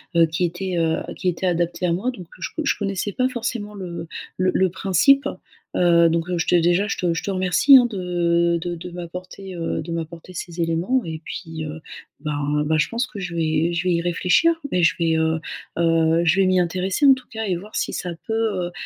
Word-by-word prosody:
heu, 165 0 +6
qui 165 +3 -2
était, 180 +2 -3
heu, 160 -1 +1 0.2
qui 185 - 0
était 180 +2 -3
adapté 175 0 0
à 170 - +2
moi. 200 +9 -1
Donc 185 -8 -11
je - - -3
co 320 - -2
je - - +2
connaissais 195 0 -2
pas 255 +4 +1
forcément 230 -4 -4
le 175 -4 -6 0.3
le 185 0 +2
le 190 -1 +3
principe, 230 - +3 0.5
heu, 170 -1 +5
donc 165 0 0
je 165 - -1
te 180 - +4
déjà 175 +4 +3
je - - -2
te 175 -2 0
je 165 - -3
te 200 - -2
remercie, 185 +9 +6
hein, 245 - +5
de 170 -3 +1
de 175 0 -3
de 170 +2 -8
m'apporter, 180 +2 -8
heu, 165 -1 -2
de 170 - -7
m'apporter 165 +2 -6
ces 170 0 -5
éléments 170 +11 +1
et 160 -1 -5
puis, 160 -3 -6
heu, 155 +1 -6 0.4
ben 150 0 -1
ben, 155 +1 +2
je 150 - +2
pense 235 +2 -1
que 205 - -9
je 175 -2 -5
vais 160 +1 +1
je 170 +1 -1
vais 180 - +3
y 170 - 0
réfléchir 180 - +3 0.2
et 180 -1 +2
je - - +4
vais, 165 -1 +2
heu 160 0 +1 0.4
heu, 165 0 +3
je 160 +1 +4
vais 195 - +5
m'y 185 0 +3
intéresser 185 - 0
en 275 - +9
tout 260 -1 -7
cas 220 -1 -4
et 185 -3 0
voir 210 +4 -11
si - - -1
ça 180 - -3
peut, 220 - -3 0.3
heu - - -9
175 Hz, 230 wpm, -22 LUFS, 165-190 Hz, 0.5 s, en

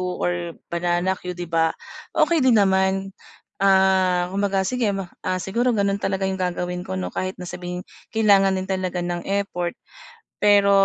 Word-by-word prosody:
or 175 -2 -2 0.2
banana 175 +2 +1
cue, 180 -1 -6
'di 175 - -4
ba. 165 -1 +1 0.4
Okey 335 -2 +3
din 255 -4 +5
naman, 190 -1 +2 0.5
ah, 190 -2 +3
kumbaga 195 -1 0
sige 240 +3 0
ma 190 -3 -6
ah, 185 0 -1
siguro 230 +6 0
gano'n 200 0 +1
talaga 195 -1 -1
'yung 190 0 -2
gagawin 180 0 -2
ko 95 - -3
'no 90 -1 -4
kahit 185 0 -3
na 180 - -8
sabihing 180 0 -6 0.2
kailangan 200 -4 +4
din 185 - -2
talaga 185 -2 -2
ng 175 +1 -4
effort. 195 -3 -2 0.6
Pero, 205 -1 +5
190 Hz, 160 wpm, -23 LUFS, 180-195 Hz, 0.6 s, din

